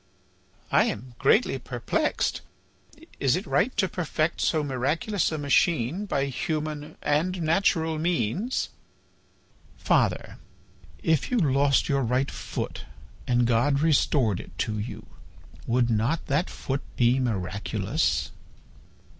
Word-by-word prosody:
"I - - +5
am 125 +4 -4
greatly 200 - +3
perplexed. - - -1 0.8
Is 135 +1 +3
it 185 +4 -3
right 250 - +1
to 195 -3 +3
perfect 165 -2 -1
so 155 -2 +2
miraculous 145 - 0
a 155 - -2
machine 155 - +1
by 140 -6 0
human 150 +2 -3
and 170 +5 +1
natural 160 -1 +2
means?" 175 - -1 1.1
"Father, - - 0 0.6
if 160 -3 +1
you 250 - +1
lost 140 - +3
your 140 -1 +1
right 125 +3 0
foot - - -5 0.4
and 120 -1 +3
God 125 +5 +2
restored 140 - +2
it - - -11
to 110 -1 -1
you, 105 - -6 0.6
would 120 0 +2
not 115 +9 0
that 145 +6 0
foot 135 +1 -3
be 120 +2 +3
miraculous?" 100 -5 -1
140 Hz, 115 wpm, -26 LUFS, 125-165 Hz, 1.1 s, I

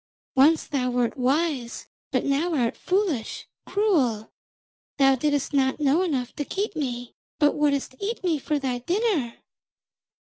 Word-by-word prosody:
Once 295 +5 +4
thou 260 -4 -1
wert 245 -1 0
wise, 265 -1 -1 0.2
but - - 0
now 310 +5 +1
art 240 -5 +1
foolish, 365 - -1 0.2
cruel. 275 - +1 0.7
Thou 270 -1 +5
didst 285 +2 0
not 265 0 +2
know 295 +3 +3
enough 265 -9 -1
to 290 - -1
keep 395 +6 -3
me, 245 -5 -4 0.2
but 295 -2 +4
wouldst 285 -3 0
eat 430 +2 -3
me 335 -5 +1
for 300 +2 -1
thy 260 -3 -2
dinner!' 345 - 0
280 Hz, 140 wpm, -25 LUFS, 250-330 Hz, 0.7 s, Thou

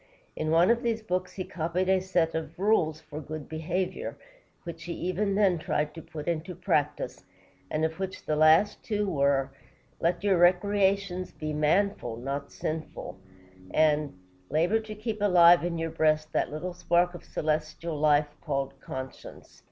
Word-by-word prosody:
In 155 - -2
one 170 +5 +5
of 235 0 +2
these 230 -3 -1
books 185 -2 -2
he 190 - -4
copied 175 +2 -2
a 190 0 +4
set 175 -3 +1
of 160 0 -4
rules 175 -6 +2
for 155 -1 -8
good 155 0 -7
behavior, 170 +4 -3 0.5
which 165 -1 -8
he 175 - -4
even 190 +4 -1
then 195 -4 +3
tried 150 -1 -1
to 165 - -8
put 150 -1 -8
into 170 +2 -2
practice, 150 - -1 0.5
and 155 +1 0
of 160 +2 -4
which 190 -1 -5
the 155 - 0
last 155 +6 +5
two 210 -2 -1
were: 140 -5 +1 0.5
"Let 175 +3 0
your 195 -4 +3
recreations 190 0 +2
be 155 -1 -5
manful, 150 - +1
not 140 +3 -4
sinful," 155 -10 -5 0.6
and 150 -6 +2 0.3
"Labor 175 +8 +2
to 220 -1 -8
keep 215 0 -4
alive 175 -4 +7
in 175 -1 -2
your 165 0 -2
breast 155 -1 +1
that - - +1
little 175 +4 -4
spark 175 0 +2
of 175 - -10
celestial 155 0 -2
fire 150 -1 +4 0.2
called 135 -2 -2
conscience." 130 -1 -9
165 Hz, 160 wpm, -28 LUFS, 155-185 Hz, 0.6 s, alive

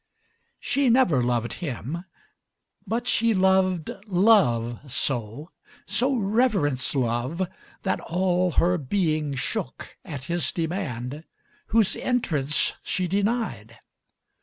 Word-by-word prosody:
She 275 -2 +1
never 230 - +4
loved 120 -1 0
him; 155 +3 -4 0.8
but 230 +4 -1
she 230 -2 +3
loved 185 -3 +2 0.2
Love 145 - +3
so, 135 - -2 0.3
So 250 +7 +1
reverenced 195 - +1
Love, 130 +8 -1 0.4
that 190 - 0
all 180 0 0
her 180 +1 +2
being 155 -1 0
shookAt 135 +2 -5
his 170 -2 -1
demand 155 -5 -3 0.4
whose 220 -3 +3
entrance 155 - +1
she 185 -1 -2
denied. 200 - -1
170 Hz, 95 wpm, -25 LUFS, 130-200 Hz, 0.8 s, never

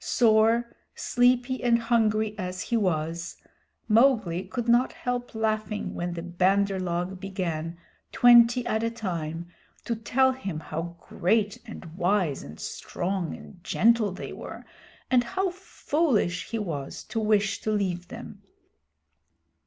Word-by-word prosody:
Sore, 225 0 +4 0.3
sleepy, 250 +1 +2
and 240 -1 +4
hungry 220 -2 +1
as 185 -1 -4
he 235 - -1
was, 170 -5 -1 0.5
Mowgli 220 -6 +3
could 240 -2 -4
not 240 +2 +4
help 245 -2 -4
laughing 215 -1 -1
when 175 0 -3
the 170 -1 -5
Bandar 190 +3 +1
log 180 +1 -2
began, 170 -4 -3 0.3
twenty 240 0 +6
at 220 - 0
a 230 - +1
time, 170 -7 -4 0.4
to 235 - -1
tell 260 +4 +2
him 200 -11 -5
how 165 +2 -5
great 205 +2 0
and 220 - -9
wise 180 -5 +1
and 75 +2 -11
strong 180 -1 -3
and 180 -3 -14
gentle 225 0 +3
they 185 - -7
were, - - -9 0.5
and 250 -1 +5
how 380 +8 -1
foolish 295 - -1
he 230 - -2
was 155 -10 -4
to 225 - -4
wish 210 -2 +1
to - - -2
leave 185 -4 -1
them. - - -10
210 Hz, 135 wpm, -27 LUFS, 180-235 Hz, 0.5 s, twenty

